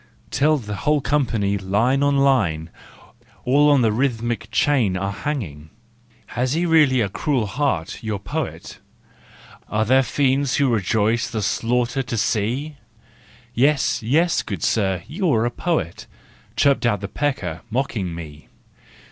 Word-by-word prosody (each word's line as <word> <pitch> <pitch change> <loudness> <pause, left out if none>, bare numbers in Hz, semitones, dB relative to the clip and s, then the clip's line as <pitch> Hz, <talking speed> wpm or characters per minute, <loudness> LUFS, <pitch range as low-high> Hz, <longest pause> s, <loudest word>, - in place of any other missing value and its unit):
— - - -33
Till 155 +2 +3
the 105 -6 -6
whole 150 +6 +1
company, 115 -9 0
line 110 +8 +1
on 140 0 +2
line, 100 - +1 0.7
All 145 +4 +4
on 140 -4 +4
the 110 - +3
rhythmic 120 -2 -1
chain 110 -3 +2
are 95 +1 -2
hanging. 100 - -5 0.6
Has 125 +2 0
he 170 +3 0
really 150 -7 +4
a 105 - +1
cruel 125 - -1
heart, 105 - -2
your 110 -2 -2
poet? 100 - -5 0.9
Are 110 +1 0
there 130 +4 +4
fiends 135 -1 +1
who 135 -4 +2
rejoice, 110 +2 +1
the 110 -3 -3
slaughter 120 +5 0
to 120 -2 -4
see? 120 +7 -1 0.8
"Yes, 140 +4 +2
yes, 160 +10 +2
good 95 -7 -6
sir, 95 -5 0
you 175 +2 -1
are 110 +1 +2
a 120 - 0
poet," 150 - -2 0.5
Chirped 140 -4 +3
out 105 -4 0
the 100 - -4
pecker, 100 - -3
mocking 110 -8 -2
me. 75 -3 -10
120 Hz, 145 wpm, -21 LUFS, 100-140 Hz, 0.9 s, All